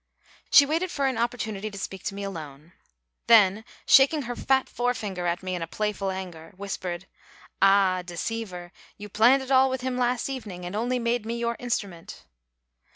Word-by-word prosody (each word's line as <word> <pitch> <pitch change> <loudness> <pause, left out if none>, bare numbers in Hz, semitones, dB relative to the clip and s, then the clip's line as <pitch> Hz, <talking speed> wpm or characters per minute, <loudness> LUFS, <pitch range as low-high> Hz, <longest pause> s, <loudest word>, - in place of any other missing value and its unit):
She 285 - +8
watched 330 +5 -1
for 280 -4 -1
an 260 -4 0
opportunity 220 -3 -2
to 200 - -10
speak 190 -1 -6
to 195 - -3
me 200 - -5
alone, 155 -5 -8 0.6
then, 215 -2 +5 0.2
shaking 280 +2 +5
her 245 0 -5
fat 265 +1 +1
forefinger 215 -7 -2
at 175 +2 -2
me 185 0 -3
in 175 -2 -3
playful 210 +1 -2
anger, 185 -2 -7
whispered, 190 -2 -5 0.6
"Ah, 195 -2 +4
deceiver, 180 0 -5 0.3
you 210 0 -9
planned 245 +7 +4
it 265 - -7
all 265 0 +5
with 260 -1 -3
him 255 0 -2
last 245 0 0
evening 210 -10 -6
and 180 +3 -5
only 245 +4 0
made 235 -1 -1
me 230 +2 -4
your 235 0 -1
instrument!" 195 - -5
210 Hz, 170 wpm, -26 LUFS, 185-245 Hz, 0.6 s, She